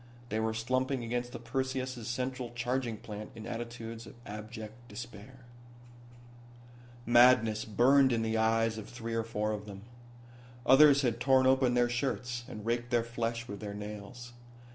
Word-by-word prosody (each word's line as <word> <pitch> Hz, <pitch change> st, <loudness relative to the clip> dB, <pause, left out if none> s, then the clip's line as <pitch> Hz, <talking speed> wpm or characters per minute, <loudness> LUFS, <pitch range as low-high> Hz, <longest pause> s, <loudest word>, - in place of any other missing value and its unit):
They 110 Hz, -, -1 dB
were 110 Hz, 0 st, 0 dB
slumping 130 Hz, +3 st, 0 dB
against 120 Hz, +1 st, -2 dB
the 120 Hz, -, -6 dB
Perseus' 130 Hz, 0 st, -3 dB
central 125 Hz, 0 st, -3 dB
charging 120 Hz, -1 st, -1 dB
plant 105 Hz, 0 st, -8 dB
in 110 Hz, -1 st, -8 dB
attitudes 115 Hz, -1 st, -6 dB
of -, -, -12 dB
abject 110 Hz, +1 st, -7 dB
despair. 120 Hz, +2 st, -10 dB, 1.6 s
Madness 120 Hz, -3 st, +5 dB
burned 130 Hz, +5 st, +5 dB
in 115 Hz, -1 st, +1 dB
the 110 Hz, 0 st, -1 dB
eyes 115 Hz, 0 st, +2 dB
of 105 Hz, -, -9 dB
three 115 Hz, -1 st, -6 dB
or 115 Hz, 0 st, 0 dB
four 105 Hz, -1 st, -2 dB
of 105 Hz, 0 st, -5 dB
them. 100 Hz, -1 st, -9 dB, 0.8 s
Others 140 Hz, +1 st, +7 dB
had 120 Hz, -2 st, 0 dB
torn 130 Hz, +1 st, +4 dB
open 130 Hz, -1 st, +4 dB
their 120 Hz, 0 st, +4 dB
shirts, 120 Hz, -1 st, -2 dB
and 105 Hz, -1 st, -8 dB
raked 120 Hz, +1 st, -1 dB
their 120 Hz, -2 st, +2 dB
flesh 115 Hz, 0 st, -3 dB
with 100 Hz, -1 st, -7 dB
their 100 Hz, 0 st, -6 dB
nails. 105 Hz, +4 st, -8 dB
120 Hz, 155 wpm, -31 LUFS, 110-125 Hz, 1.6 s, Others